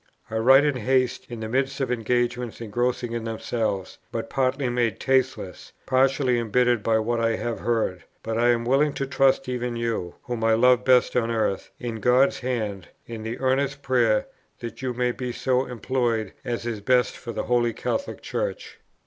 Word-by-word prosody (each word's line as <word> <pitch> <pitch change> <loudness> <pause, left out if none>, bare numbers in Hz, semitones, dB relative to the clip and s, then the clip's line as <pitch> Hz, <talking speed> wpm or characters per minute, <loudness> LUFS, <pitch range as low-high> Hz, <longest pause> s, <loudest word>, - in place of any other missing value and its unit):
I 110 - -1
write 135 +5 +6
in 145 -3 +1
haste, 130 +1 0
in 120 -2 -7
the 110 - -3
midst 135 +3 -1
of 135 -2 -1
engagements 120 0 -1
engrossing 120 +2 -1
in 115 -1 -3
themselves, 110 -3 -3
but - - -4
partly 135 0 0
made 120 -3 0
tasteless, 130 -8 -1
partly 130 -1 +2
embittered 120 +1 +2
by 110 +1 +2
what 115 +2 0
I 115 0 +1
have 115 0 -3
heard; 110 -7 -1 0.2
but 115 - -3
I 120 +2 +3
am 120 -1 +2
willing 140 +4 +3
to 135 - -2
trust 135 0 +2
even 125 -1 -2
you, 115 -7 -2
whom 120 -2 -4
I 115 0 +4
love 125 +1 +4
best 125 -1 +4
on 115 -2 +1
earth, 110 -4 -1
in 120 -2 -4
God's 125 +5 +3
Hand, 110 -7 -3 0.2
in 115 -1 -7
the 110 +2 -4
earnest 135 +1 0
prayer 120 -5 +2 0.3
that 120 +2 -8
you 130 -2 -2
may 125 0 +1
be 125 0 -4
so 130 +1 0
employed 120 -3 -1
as 120 -3 -3
is 115 -3 -3
best 125 +3 +2
for 120 - -7
the - - -3
Holy 120 -1 +2
Catholic 275 - -3
Church." - - -4
120 Hz, 185 wpm, -25 LUFS, 115-130 Hz, 0.3 s, write